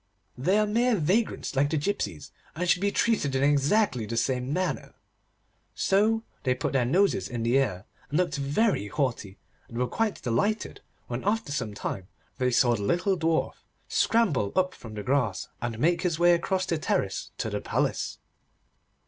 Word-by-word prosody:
They 180 +11 +2
are 215 - +3
mere 235 +3 +2
vagrants 190 +1 0
like 140 +2 +3
the 160 - 0
gipsies, 140 - -3 0.2
and 180 +3 -2
should 180 +1 +3
be 200 0 +2
treated 205 -13 +1
in 135 - +2
exactly 145 - +2
the 115 +2 -3
same 125 +2 0
manner.' 185 +4 -2 0.8
So 220 +3 +2 0.2
they 130 -2 +1
put 125 - -2
their 130 -3 +2
noses 170 - +2
in 120 -2 -3
the 120 +4 +3
air, 100 -8 -1 0.2
and 150 - 0
looked 175 -6 +1
very 140 - +1
haughty, 115 -7 -2 0.3
and 115 - -9
were 125 - +2
quite 220 - -1
delighted 205 - -1 0.2
when 120 +1 -4
after 215 -5 0
some 125 -7 -3
time 95 -2 -4 0.3
they 125 0 +2
saw 120 0 +4
the 105 - -4
little 175 - +1
Dwarf 165 -2 0 0.3
scramble 185 - +2
up 185 0 +2
from 110 -2 -10
the 105 - -5
grass, 125 -6 0
and 120 -2 -3
make 170 +7 +2
his 175 -4 0
way 175 +1 +5
across 185 +2 0
the 165 - -1
terrace 100 -9 -1
to - - -3
the - - -2
palace. - - -1
145 Hz, 175 wpm, -27 LUFS, 120-190 Hz, 0.8 s, way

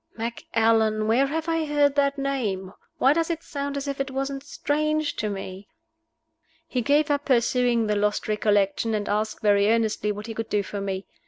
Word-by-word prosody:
"Macallan? 225 -1 +1
Where 250 +5 +3
have 320 +3 -3
I 330 -1 +1
heard 290 -1 +2
that 280 0 +1
name? 215 -9 -2 0.2
Why 270 - +4
does 330 +1 0
it 330 -1 -3
sound 280 -1 -4
as 280 +1 -4
if 275 -1 -2
it 275 - -3
wasn't 270 +1 -3
strange 305 +1 -1
to 215 - -1
me?" 195 0 -7 1.0
He 255 -6 -1
gave 290 +4 +2
up 285 0 0
pursuing 240 -2 +2
the 210 -1 0
lost 210 0 0
recollection, 210 +1 +1
and 205 -1 -2
asked, 215 +1 -2
very 205 0 +4
earnestly, 220 -2 +1
what 210 +1 -6
he 225 - -5
could 225 0 -5
do 205 -1 +1
for 200 +1 -5
me. 195 -1 -3
230 Hz, 185 wpm, -25 LUFS, 210-280 Hz, 1.0 s, Why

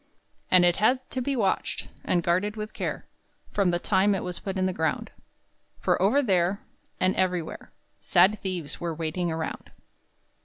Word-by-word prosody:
And 180 -1 +7
it 175 0 +3
had 255 +6 +2
to 260 - -2
be 275 +2 -1
watched 205 -6 -1
And 175 -2 +1
guarded 185 +5 +1
with 215 0 -6
care - - -4 0.5
From 200 -3 +2
the 175 - +2
time 195 +2 +2
it 190 - -3
was 180 -1 -4
put 195 -1 -4
in 185 - +1
the 185 - 0
ground, 160 -2 -1 0.7
For - - +1
over 260 +10 +4
there, 190 -3 +2 0.4
And 185 0 +2
everywhere, 180 -3 -2 0.3
Sad 210 +2 +4
thieves 180 -6 -4
were 170 -2 -2
waiting 165 +2 -2
around. 160 0 -4
185 Hz, 165 wpm, -26 LUFS, 175-205 Hz, 0.7 s, And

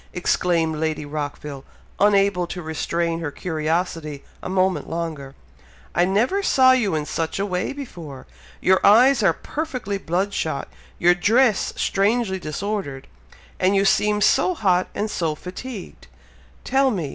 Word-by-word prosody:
exclaimed 170 -3 +1
Lady 155 -1 -2
Rockville, 145 -1 -5 0.4
unable 200 -3 +3
to 180 0 -6
restrain 165 +1 -2
her 165 -3 -3
curiosity 160 -2 -3 0.2
a - - -6
moment 185 0 0
longer. 160 -5 -5 0.6
"I 175 - +3
never 230 - +1
saw 260 -9 +5
you 220 -9 +2
in 150 -1 -1
such 160 +1 -3
a 200 - 0
way 180 -2 -2
before! 170 - -9 0.4
Your 190 0 +3
eyes 245 +4 +6
are 195 -4 +4
perfectly 250 - -4
blood 190 +4 -1
shot 155 -7 -2 0.3
your 175 +1 +5
dress 215 +4 +2
strangely 200 -1 +1
disordered 155 -4 -4 0.5
and 190 +2 +3
you 195 0 +3
seem 210 +1 +2
so 310 +11 +3
hot 185 - +2
and 210 - -1
so 165 -7 -2
fatigued! 190 +6 -9 0.6
Tell 270 0 +2
me! 175 - -2
185 Hz, 140 wpm, -22 LUFS, 160-210 Hz, 0.6 s, eyes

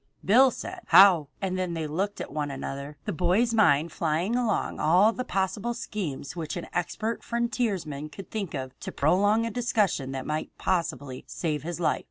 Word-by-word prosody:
Bill 255 +7 +6
said: - - -7
"How?" 175 -4 +7 0.2
and 185 -1 -1
then 180 -2 -2
they 160 -1 -2
looked 190 +7 -2
at - - -6
one 150 -1 -2
another, 140 +1 -6
the 210 - -2
boy's 185 +8 +2
mind 165 -7 +4
flying 165 +8 0
along 240 -4 0
all 185 +8 +4
the 255 - -3
possible 195 +3 -1
schemes 180 - -5
which 165 0 -4
an 175 - -5
expert 215 +6 -2
frontiersman 210 - -2
could 185 +6 -11
think 200 -7 -3
of 130 -1 -4
to - - -6
prolong 205 +9 +3
a 230 - -3
discussion 210 - 0
that 130 -1 -4
might 155 +1 -4
possibly 145 -7 -2
save 155 -4 -2
his 170 +3 -5
life. 170 - +1
180 Hz, 180 wpm, -27 LUFS, 150-215 Hz, 0.2 s, How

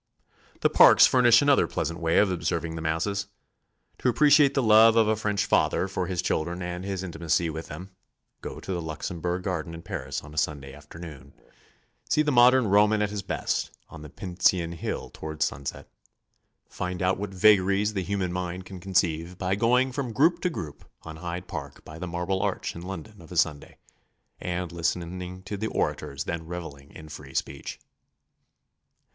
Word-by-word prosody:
The - - +4
parks - - +8
furnish 120 0 +5
another 145 -1 +4
pleasant 85 +1 -3
way 80 -1 +1
of 100 -2 +4
observing 85 -2 -2
the 80 - -5
masses. 100 +6 -1 0.7
To 125 - +2
appreciate 145 +2 +5
the 135 - +2
love 110 +1 +7
of 115 -2 +4
a 110 - +2
French 105 -1 -1
father 95 - +2
for 95 -2 -3
his 90 -2 -2
children 85 +1 -1
and 90 +1 -5
his 95 -1 -3
intimacy 85 -1 -1
with 80 +1 -6
them, 90 +6 -9 0.5
go - - -7
to 95 - -5
the 85 - -2
Luxembourg 85 +3 -4
Garden 85 -3 -3
in 85 - -10
Paris 65 +3 -5
on 75 - -12
a 80 - 0
Sunday 70 -3 -3
afternoon. 75 -2 -11 0.8
See 155 - +3
the 150 - +1
modern 125 0 +6
Roman 105 +1 +4
at 105 - -2
his 105 -1 -3
best 95 - -3
on 80 - -11
the 75 - -10
Pincian 90 -1 0
Hill 85 - -5
toward 80 0 -4
sunset. 70 +1 -4 0.8
Find 90 0 -4
out 95 +1 +1
what 105 -1 -3
vagaries 100 +1 +4
the 95 - -1
human 95 -1 -2
mind 90 0 -4
can 95 -1 -9
conceive 90 -2 0
by 95 0 -1
going 125 +5 +2
from 130 -3 -4
group 160 +9 +3
to 180 - +1
group 80 - -7 0.2
on 80 -1 -8
Hyde 90 +1 -5
Park 70 -4 -7
by 80 +1 -10
the 90 - -4
Marble 90 +3 -2
Arch - - -2
in 85 - -7
London 95 +2 -8
of 80 - -15
a 90 - -5
Sunday, 75 -3 0 0.6
and 90 -1 -3
listening 90 +2 -3
to 100 +1 -5
the 110 +2 -2
orators 70 -8 -2
then 80 0 -5
revelling 80 -5 -8
in 80 - -12
free 75 -3 -11
speech. 70 0 -4
90 Hz, 180 wpm, -26 LUFS, 80-100 Hz, 0.8 s, parks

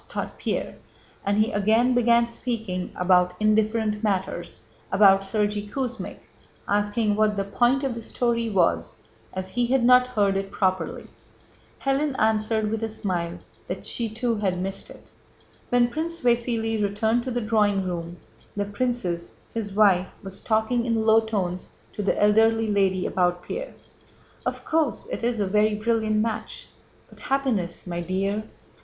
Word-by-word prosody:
thought - - -4
Pierre, - - -3 0.5
and 200 +1 +1
he 215 +3 +2
again 220 +5 +3
began 235 -1 +4
speaking 220 -6 -4
about 180 0 +3
indifferent 215 0 +1
matters, 190 -4 -2 0.3
about 195 0 +6
Sergéy 205 +1 -1
Kuzmích, 255 -1 -4 0.5
asking 205 +1 +1
what 210 -1 +2
the 195 - +1
point 240 +7 +2
of 270 -3 0
the 230 - -6
story 235 0 -1
was 185 -5 +1 0.4
as 185 0 -5
he 240 +4 0
had 260 0 +2
not 250 0 +6
heard 205 -5 +1
it 195 0 -3
properly. 185 -3 -1 0.8
Hélène 275 0 0
answered 220 0 +1
with 225 0 -2
a 225 - -1
smile 175 -5 -3 0.3
that - - -5
she 230 -2 -2
too 230 +1 -1
had 190 -3 -1
missed 195 +1 -4
it. - - -14 0.6
When 245 -1 +4
Prince 335 +3 -3
Vasíli 235 -3 +1
returned 220 +3 +1
to - - -2
the 245 -1 -1
drawing 210 -3 +2
room, 175 -1 -4 0.4
the 205 - 0
princess, 205 -6 -3 0.2
his 220 -3 -3
wife, 190 -3 +4 0.2
was 195 0 -8
talking 230 +2 +1
in 225 -1 +1
low 220 0 +6
tones 195 -5 -3 0.2
to - - -4
the 200 - 0
elderly 225 +2 +4
lady 190 -2 +2
about 180 -1 0
Pierre. - - -6 0.7
"Of - - -4
course, 315 -5 0
it - - -4
is 235 -1 0
a 205 - +1
very 210 +2 +2
brilliant 220 0 0
match, 220 -1 -5 0.4
but - - -18
happiness, 255 -11 -1
my 175 -1 -3
dear..." 195 +4 -1
215 Hz, 155 wpm, -25 LUFS, 195-235 Hz, 0.8 s, about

